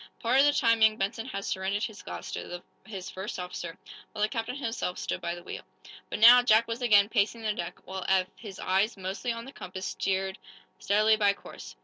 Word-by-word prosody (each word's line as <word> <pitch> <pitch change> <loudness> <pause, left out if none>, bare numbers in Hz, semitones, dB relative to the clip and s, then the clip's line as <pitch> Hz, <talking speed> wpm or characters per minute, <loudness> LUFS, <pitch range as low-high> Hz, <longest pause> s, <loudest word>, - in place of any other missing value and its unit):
Part 245 +3 +2
of 280 - +7
the 290 - +5
time 230 -5 +2
young 220 0 +5
Benson 225 +4 -2
had 200 -6 -5
surrendered 195 +2 -1
his 220 -3 -5
glass - - -7
to 175 0 -6 0.2
his 195 -4 -7
first 190 +5 -5
officer, 180 -2 -6 0.3
while 210 -1 -2
the 215 - +2
captain 230 +2 -3
himself 230 -9 -3
stood - - -3
by 170 0 -2
the 175 - -11
wheel. - - -7 0.5
But - - -3
now, 240 +3 +9
Jack 230 -1 +4
was 230 +2 -4
again 205 -4 +5
pacing 225 +1 0
the 215 -1 0
deck, 175 -4 -5
while 190 0 -5
Eph, 190 -1 +4
his 200 -5 -10
eyes 195 +4 +1
mostly 190 +6 -3
on 230 0 -5
the 270 - -9
compass, 185 -5 -7
steered 190 0 -2 0.4
steadily 215 +2 +3
by 205 -2 +3
course. - - -11
210 Hz, 215 wpm, -28 LUFS, 190-230 Hz, 0.5 s, now